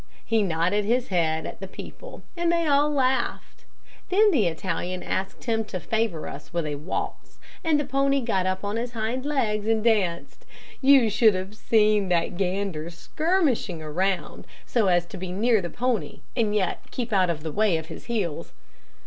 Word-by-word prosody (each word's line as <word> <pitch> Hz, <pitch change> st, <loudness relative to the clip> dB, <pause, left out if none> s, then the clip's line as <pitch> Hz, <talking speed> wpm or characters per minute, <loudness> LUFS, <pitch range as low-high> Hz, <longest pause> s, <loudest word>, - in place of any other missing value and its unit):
He 225 Hz, -1 st, +2 dB
nodded 180 Hz, +2 st, +1 dB
his 240 Hz, +4 st, 0 dB
head 160 Hz, -4 st, +1 dB
at -, -, -7 dB
the 195 Hz, -, -6 dB
people, -, -, -10 dB
and 340 Hz, -1 st, +1 dB
they 335 Hz, -1 st, +1 dB
all 290 Hz, 0 st, +4 dB
laughed. 265 Hz, -2 st, -1 dB, 0.4 s
Then 415 Hz, +3 st, +5 dB
the 230 Hz, -, +3 dB
Italian 175 Hz, +2 st, -3 dB
asked 190 Hz, +2 st, -3 dB
him 225 Hz, -1 st, 0 dB
to 190 Hz, -3 st, -5 dB
favor 220 Hz, -6 st, -1 dB
us -, -, -9 dB
with 170 Hz, -2 st, -1 dB
a 150 Hz, -, -2 dB
waltz, 150 Hz, +5 st, -5 dB, 0.3 s
and 315 Hz, -3 st, +3 dB
the 290 Hz, -, -1 dB
pony 275 Hz, +1 st, +2 dB
got 195 Hz, -7 st, 0 dB
up 185 Hz, +1 st, -2 dB
on 205 Hz, +2 st, -2 dB
his 240 Hz, +1 st, -3 dB
hind 235 Hz, +4 st, -2 dB
legs 220 Hz, -8 st, 0 dB
and 225 Hz, -1 st, +2 dB
danced. 200 Hz, -7 st, 0 dB, 0.4 s
You 265 Hz, -5 st, +6 dB
should 215 Hz, 0 st, +5 dB
have 190 Hz, +3 st, -5 dB
seen 210 Hz, -3 st, +3 dB
that 175 Hz, 0 st, +1 dB
gander 185 Hz, -3 st, -2 dB
skirmishing 275 Hz, -, 0 dB
around, 180 Hz, +5 st, -2 dB, 0.2 s
so 225 Hz, -5 st, +1 dB
as 175 Hz, -1 st, +3 dB
to 180 Hz, -, -9 dB
be 185 Hz, 0 st, -5 dB
near 220 Hz, +3 st, +2 dB
the 175 Hz, -, -4 dB
pony 235 Hz, -11 st, -2 dB
and 220 Hz, -4 st, +1 dB
yet 190 Hz, -4 st, 0 dB
keep 240 Hz, -3 st, -4 dB
out 185 Hz, -3 st, +3 dB
of 155 Hz, -3 st, -2 dB
the 160 Hz, -, -3 dB
way 205 Hz, -1 st, +2 dB
of 160 Hz, -, -5 dB
his -, -, -10 dB
heels. 200 Hz, -10 st, -3 dB
210 Hz, 185 wpm, -25 LUFS, 180-245 Hz, 0.4 s, You